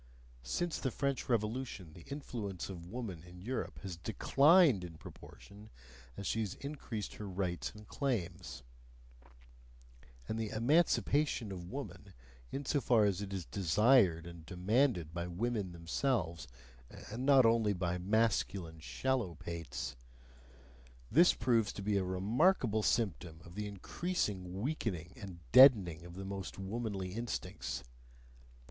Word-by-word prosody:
Since 170 - -2
the 130 - -1
French 140 +1 -2
Revolution 110 -6 -2
the 85 - -12
influence 110 - -5
of 85 -2 -8
woman 105 -7 -5
in 90 +1 -13
Europe 120 +7 -4
has 95 -4 -5
DECLINED 140 - +4
in 85 -3 -8
proportion 100 +6 -13 0.5
as 100 - -5
she 115 - 0
has 105 -4 -2
increased 135 -8 -5
her 105 - -6
rights 90 -2 -2
and 105 -1 -12
claims; 90 - -3 1.6
and 110 - -2
the 110 -2 -2
"emancipation 140 - +2
of 90 -2 -7
woman," 100 -8 -7 0.4
insofar 135 -5 +2
as 100 -1 +1
it 100 -1 -5
is 95 -4 -4
desired 95 -1 +4
and 85 -1 -10
demanded 90 - +1
by 85 0 -3
women 100 +1 -2
themselves 85 - -1 0.6
(and 120 +4 -4
not 135 -2 +6
only 115 -2 +4
by 90 -2 -1
masculine 95 -4 0
shallow 120 +1 -1
pates), 80 -6 -5 1.2
thus 170 +6 +6
proves 115 -3 +2
to 100 - -6
be 100 0 +1
a 95 - +1
remarkable 110 - +2
symptom 90 -8 0
of 85 - -12
the 105 +2 -4
increased 170 - -2
weakening 95 - -4
and 95 -6 -9
deadening 105 - +7
of 85 0 -10
the 95 +1 -6
most 95 -1 -5
womanly 95 -2 -3
instincts. 115 +2 -4
100 Hz, 130 wpm, -34 LUFS, 90-120 Hz, 1.6 s, deadening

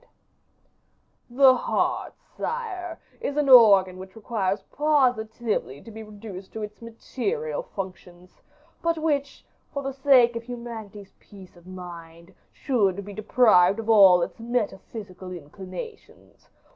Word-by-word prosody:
"The 260 +1 +6
heart, 245 - -1 0.2
sire, 365 -8 -5 0.2
is 285 - -4
an 295 -2 +1
organ 200 -7 +7
which 190 0 -11
requires 205 -3 -2
positively 240 - 0
to 225 - -13
be 220 +1 -9
reduced 205 -3 -10
to 220 - -5
its 210 +1 -9
material 405 - -4
functions, 185 - -10 0.4
but 335 0 0
which, 290 -3 -2 0.3
for 280 - -4
the 270 0 -4
sake 260 -3 +4
of 230 - -3
humanity's 225 -4 -9
peace 190 -3 -15
of 175 +1 -19
mind, 170 -1 -11 0.2
should 200 -8 0
be 205 - -9
deprived 210 -3 +4
of 225 0 -1
all 190 -5 +7
its 170 - -6
metaphysical 205 -5 -4
inclinations. 185 - -11
220 Hz, 120 wpm, -25 LUFS, 190-255 Hz, 0.4 s, organ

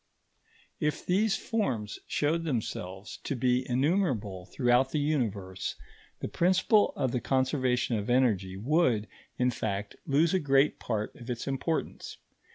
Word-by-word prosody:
If 150 0 -1
these 200 +3 +2
forms 130 - -2
showed 160 +3 0
themselves 105 - -4
to 140 - -4
be 125 +1 +1
innumerable 125 - 0
throughout 125 0 +2
the 150 - -2
Universe, 110 -11 -1 0.5
the - - -2
principle 190 +4 +3
of 130 - 0
the 125 - -1
conservation 130 -3 +1
of 105 - -5
energy 105 -7 +2
would, 120 - +2 0.3
in 125 0 +2
fact, 100 -3 -3
lose 155 +5 +3
a 190 - +3
great 140 -1 +3
part 110 -2 -3
of 120 0 -10
its 120 -1 -3
importance. 140 +4 -3
130 Hz, 135 wpm, -29 LUFS, 110-150 Hz, 0.5 s, principle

